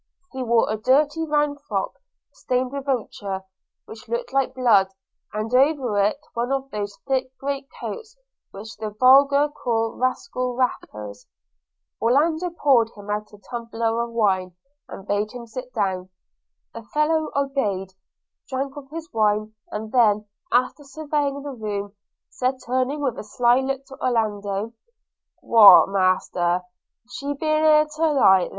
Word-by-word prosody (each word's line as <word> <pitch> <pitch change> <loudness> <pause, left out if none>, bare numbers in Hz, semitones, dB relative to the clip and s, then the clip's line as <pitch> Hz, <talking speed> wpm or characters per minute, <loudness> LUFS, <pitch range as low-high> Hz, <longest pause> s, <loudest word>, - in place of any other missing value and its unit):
He 265 - -5
wore 235 -2 +2
a 215 - -1
dirty 295 +7 +2
round 295 -1 0
frock 195 -3 -2 0.4
stained 250 0 -1
with 280 0 -5
ochre 200 -6 -3 0.4
which 220 0 -12
looked 240 +2 -3
like 270 -1 +1
blood, 210 -7 +4 0.4
and 215 +3 -4
over 260 -5 +3
it 200 +5 +2 0.2
one 240 +2 -2
of 270 0 -2
those 205 -1 -4
thick 260 -1 -1
great 275 0 -4
coats 455 0 -7 0.3
which 215 +3 -10
the 215 0 -4
vulgar 275 +6 +5
call 225 -5 -1
rascal 255 -1 -2
wrappers. 105 - -3 0.7
Orlando 315 +9 +2
poured 270 -9 +3
him 205 0 -8
out 210 0 -3
a 210 - -14
tumbler 230 -1 -2
of 235 - -3
wine, 190 -6 0 0.3
and 195 - -10
bade 205 +1 -1
him 245 -1 -8
sit 250 +2 -8
down. 190 -5 -2 0.6
The 230 - -7
fellow 305 +6 0
obeyed, 240 -10 -1 0.6
drank 270 +1 -3
off 275 -2 -10
his 325 +1 -7
wine, 215 0 +1 0.2
and 215 +1 -6
then, 215 -4 +3 0.3
after 255 +4 +1
surveying 285 -1 -2
the 285 - -5
room, 205 -4 -4 0.3
said 255 +1 -1
turning 260 +4 -1
with 265 -5 -1
a - - -6
sly 240 +3 +3
look 270 0 -3
to 270 -1 -12
Orlando, 210 -3 -1 0.7
'What, 220 -5 +8
Master, 185 -2 +1 0.4
she 280 +3 -4
ben't - - -21
here 310 0 +2 0.2
then - - -11
to 320 -1 +2
night?' 190 -5 +5
245 Hz, 145 wpm, -23 LUFS, 210-275 Hz, 0.7 s, What